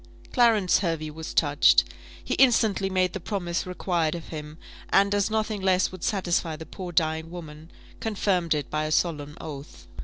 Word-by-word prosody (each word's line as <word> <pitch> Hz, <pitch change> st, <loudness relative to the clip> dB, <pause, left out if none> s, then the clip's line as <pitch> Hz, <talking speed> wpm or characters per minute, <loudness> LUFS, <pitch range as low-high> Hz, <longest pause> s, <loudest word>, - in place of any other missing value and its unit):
Clarence 225 Hz, -7 st, +4 dB
Hervey 165 Hz, -4 st, -2 dB
was 160 Hz, +1 st, -7 dB
touched. 145 Hz, -1 st, +4 dB, 0.4 s
He -, -, -2 dB
instantly 220 Hz, -7 st, +3 dB
made 185 Hz, -1 st, +1 dB
the -, -, -4 dB
promise 180 Hz, -2 st, -3 dB
required 175 Hz, -3 st, -1 dB
of 170 Hz, -, -8 dB
him; 150 Hz, -1 st, -7 dB, 0.3 s
and, 200 Hz, +1 st, +4 dB
as 205 Hz, 0 st, +1 dB
nothing 215 Hz, -1 st, -1 dB
less 190 Hz, -1 st, +2 dB
would 185 Hz, -2 st, -10 dB
satisfy 175 Hz, -5 st, 0 dB
the 160 Hz, +1 st, -9 dB
poor 180 Hz, 0 st, -7 dB
dying 160 Hz, -1 st, 0 dB
woman, 160 Hz, -2 st, -10 dB, 0.3 s
confirmed 190 Hz, -6 st, 0 dB
it 145 Hz, -3 st, -4 dB
by 155 Hz, 0 st, -1 dB
a 155 Hz, -, -3 dB
solemn 150 Hz, -3 st, -1 dB
oath. 145 Hz, -3 st, -9 dB
175 Hz, 165 wpm, -26 LUFS, 155-195 Hz, 0.4 s, Clarence